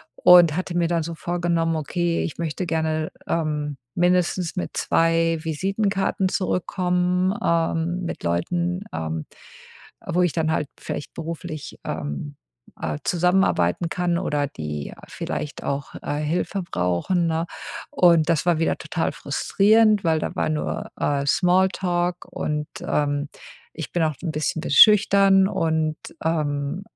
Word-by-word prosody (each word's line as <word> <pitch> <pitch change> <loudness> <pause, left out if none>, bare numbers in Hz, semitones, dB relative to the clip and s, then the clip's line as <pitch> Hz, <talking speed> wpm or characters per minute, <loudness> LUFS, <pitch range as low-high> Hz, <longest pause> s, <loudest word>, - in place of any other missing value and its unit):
und 175 -4 +7
hatte 180 0 -2
mir 170 -1 +2
dann 170 -1 0
so 165 +1 -5
vorgenommen: 170 -1 0
„Okay, 170 +2 -1
ich - - -5
möchte 170 +2 -3
gerne, 160 -1 -1 0.2
ähm, 150 -3 -1 0.2
mindestens 180 -1 +1
mit 180 - -4
2 165 0 +2
Visitenkarten 195 +4 0
zurückkommen, 180 0 0
ähm, 170 +1 0
mit - - -5
Leuten, 175 - -1
ähm, 80 -1 -3 0.8
wo 180 - +1
ich 175 - +2
dann 160 -1 0
halt 150 -3 -1
vielleicht 145 - -5
beruflich, 165 -1 -6
ähm, 75 - -4 0.5
äh, 80 -2 -2
zusammenarbeiten 175 - +2
kann 175 0 0
oder 150 -5 0
die 75 - -6
vielleicht 150 - -5
auch, 140 0 -3
äh, 145 - -2
Hilfe 175 +5 -1
brauchen“, 90 - 0
ne? 165 0 0 0.5
Und 170 -3 +4
das 165 -1 +2
war 175 -3 +2
wieder 165 - +1
total - - -2
frustrierend, 215 0 +3
weil 160 -2 +2
da - - -4
war - - 0
nur, 155 -1 -3
äh, 140 -1 0
Smalltalk 180 0 +1
und, 150 0 -2
ähm, 145 -1 -1 0.5
ich 155 -4 -6
bin 175 - +1
auch 155 -1 +1
'n 170 - -1
bisschen 155 +1 -2
be - - -5
schüchtern. 195 +2 +6
Und, 160 -4 0 0.3
äh 160 - +2
äh, 145 +4 -3
165 Hz, 140 wpm, -23 LUFS, 150-180 Hz, 0.8 s, und